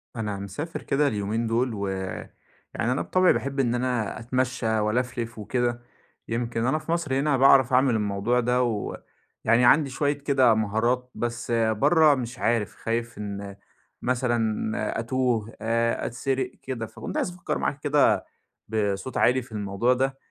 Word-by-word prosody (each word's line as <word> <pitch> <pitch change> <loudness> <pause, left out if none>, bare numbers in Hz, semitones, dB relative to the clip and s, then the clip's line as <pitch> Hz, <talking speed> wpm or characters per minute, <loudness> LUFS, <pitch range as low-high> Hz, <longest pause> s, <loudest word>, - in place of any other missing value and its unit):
أنا 105 -3 -3
مسافر 100 - -5
كده 145 +1 +2
اليومين 110 +1 -1
دول 120 +2 0
و 100 -2 -3 0.9
يعني 120 - -1
أنا 130 - 0
بِطَبعي 185 0 +3
باحب 140 0 -3
إن 120 -3 +2
أنا 120 -5 -1
أتمشّى 120 -2 0
وألَفْلِف 115 +1 -2
وكده. 120 +2 -1 0.5
يمكن 115 0 -2
أنا 140 +5 +2
في 155 +1 -6
مصر 165 -5 -1
هنا 145 -1 +2
باعرف 135 -1 +5
أعمل 130 -1 +4
الموضوع 105 +3 0
ده 125 +1 +2
و 110 -4 -2 0.5
يعني 115 +2 +4
عندي 140 +3 +5
شوية 145 +2 0
كده 140 -4 +3
مهارات، 115 +4 0
بس 120 0 -3
برّه 115 +8 +4
مش 125 -1 -5
عارف. 115 -5 0
خايف 115 0 -3
إن 100 -1 -6 0.5
مثلًا 115 -4 -1
أتوه، 115 -2 -1
أ 115 +1 0
أتسرق 130 +1 -2
كده. 125 -4 -4
فكنت - - -7
عايز - - 0
أفكّر 175 -1 -4
معاكِ 145 - -2
كده 145 -1 +3 0.4
بصوت 105 +2 -2
عالي 125 +2 +3
في 120 - -15
الموضوع 105 +3 0
ده، 135 +1 -1
120 Hz, 150 wpm, -25 LUFS, 110-130 Hz, 0.9 s, باعرف